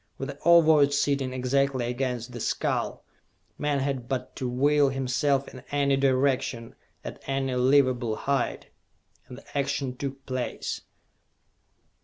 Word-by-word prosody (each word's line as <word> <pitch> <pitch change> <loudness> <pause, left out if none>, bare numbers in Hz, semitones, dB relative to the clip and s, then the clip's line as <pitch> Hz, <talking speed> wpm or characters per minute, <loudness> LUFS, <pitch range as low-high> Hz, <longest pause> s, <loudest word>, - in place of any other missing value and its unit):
With 135 - -5
the 140 0 -8
Ovoid 155 -4 +6
sitting 140 -2 +1
exactly 130 0 0
against 125 -1 -3
the 120 - -7
skull, - - -2 0.5
man 150 -1 0
had 130 -3 -3
but 130 -1 -3
to 130 - -2
will 140 +3 +3
himself 135 +1 0
in 130 - -9
any 140 -1 +2
direction, 130 -2 +1 0.3
at - - -8
any 135 -1 -1
livable 125 -3 +3
height, 140 +2 -2 0.6
and 125 - -10
the 140 - -14
action 140 -2 -1
took 135 0 -6
place. 130 -2 -3
135 Hz, 130 wpm, -27 LUFS, 125-140 Hz, 0.6 s, Ovoid